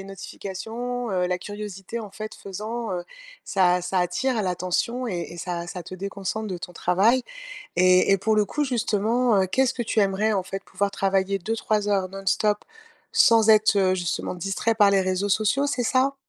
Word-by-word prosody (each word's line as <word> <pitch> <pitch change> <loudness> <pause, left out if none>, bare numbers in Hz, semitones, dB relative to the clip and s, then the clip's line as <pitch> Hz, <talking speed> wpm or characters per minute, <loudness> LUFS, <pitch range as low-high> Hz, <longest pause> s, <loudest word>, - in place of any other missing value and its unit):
une 195 - -12
notification, 225 +5 -5
heu, 180 -2 +1
la 180 - 0
curiosité 205 +3 -6
en 215 - -7
fait 215 +2 -7
faisant, 220 +4 -5
heu, 175 -1 -3 0.4
ça 180 -2 +2
ça 185 +1 -1
attire 215 +7 0
l'attention 185 +7 -1
et 180 -6 -2
et - - -9
ça 170 0 -4
ça 180 0 -6
te 185 - -9
déconcentre 200 +3 -4
de 185 - -3
ton 180 - -8
travail, 200 +9 +2 0.5
et 185 +1 +5
et 195 - +5
pour 215 +3 +1
le 210 - +4
coup 295 +7 -2
justement, 230 -2 +1
heu, 190 - 0
qu'est-ce 260 +6 +2
que 240 - -3
tu 220 -1 +1
aimerais 200 +3 +1
en 195 -2 0
fait, 195 +1 -6
pouvoir 200 -1 -1
travailler 195 0 0
2-3 215 +1 -1
heures 195 -2 +1
non-stop 195 +2 0 0.6
sans 225 -2 +5
être, 215 -1 +5
heu, 185 -1 +3
justement 180 0 -3
distrait 195 +5 -1
par 205 -2 +5
les 195 - +4
réseaux 185 +2 0
sociaux, 220 +8 +2
c'est 250 -3 -1
ça? 265 +3 +2
200 Hz, 190 wpm, -24 LUFS, 185-225 Hz, 0.6 s, et